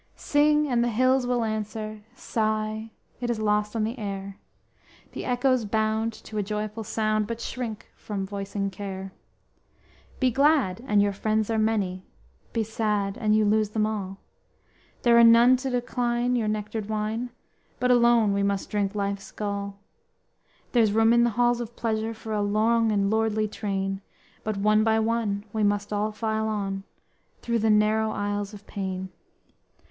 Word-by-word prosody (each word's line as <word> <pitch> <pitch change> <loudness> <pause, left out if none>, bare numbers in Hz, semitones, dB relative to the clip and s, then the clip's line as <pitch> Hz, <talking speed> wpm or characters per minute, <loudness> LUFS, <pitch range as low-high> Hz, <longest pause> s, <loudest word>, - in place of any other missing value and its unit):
Sing 300 +1 +3
and 240 -3 +2
the 240 - +1
hills 255 +2 +2
will 245 -1 +1
answer, 215 0 -4
Sigh, 215 0 -2 0.3
it 240 -1 -3
is 235 - 0
lost 210 0 0
on 220 - +1
the 230 +4 -3
air, 195 -1 -5 0.7
The - - -6
echoes 250 0 +2
bound 220 +1 0
to 215 - -5
a - - +2
joyful 210 +2 -4
sound, 215 0 0
But 230 0 -4
shrink 235 -2 -5
from 200 -2 -4
voicing 200 0 -3
care._ 190 0 -6 1.1
_Be 255 -3 +2
glad 275 -7 +3
and 205 -1 +4
your 205 -1 +1
friends 215 +2 0
are 220 - +1
many; 200 -4 0 0.5
Be 230 - 0
sad 210 -2 -1
and 215 -1 +1
you 215 0 +3
lose 215 0 +2
them 215 0 0
all; 200 -3 -4 0.9
There 235 -1 +6
are - - +8
none 235 +2 +7
to 265 +1 -3
decline 245 0 0
your 230 -3 0
nectared 215 0 -3
wine, 220 +3 -2 0.5
But 250 0 +2
alone 235 -3 +4
we 200 - +1
must 200 -1 -1
drink 205 -1 -1
life's 200 -1 -3
gall. 200 -1 -4 0.9
There's 225 -4 +3
room 225 +1 +4
in 235 0 +5
the - - +3
halls 240 0 +3
of 235 0 -7
pleasure, 225 0 -2
For 220 0 -6
a 210 - 0
long 220 +2 +2
and 200 -1 +1
lordly 220 -1 +1
train, 195 -2 -3 0.4
But 215 -2 -2
one 215 +2 +3
by 220 0 +3
one 220 -2 -1
we 220 - -1
must 205 0 0
all 210 +1 0
file 220 0 -1
on; 195 -2 -3 0.6
Through 235 -1 0
the 220 +1 +2
narrow 215 +1 +3
aisles 205 -1 -2
of 205 0 -13
pain. 190 -2 -4
215 Hz, 165 wpm, -26 LUFS, 205-230 Hz, 1.1 s, are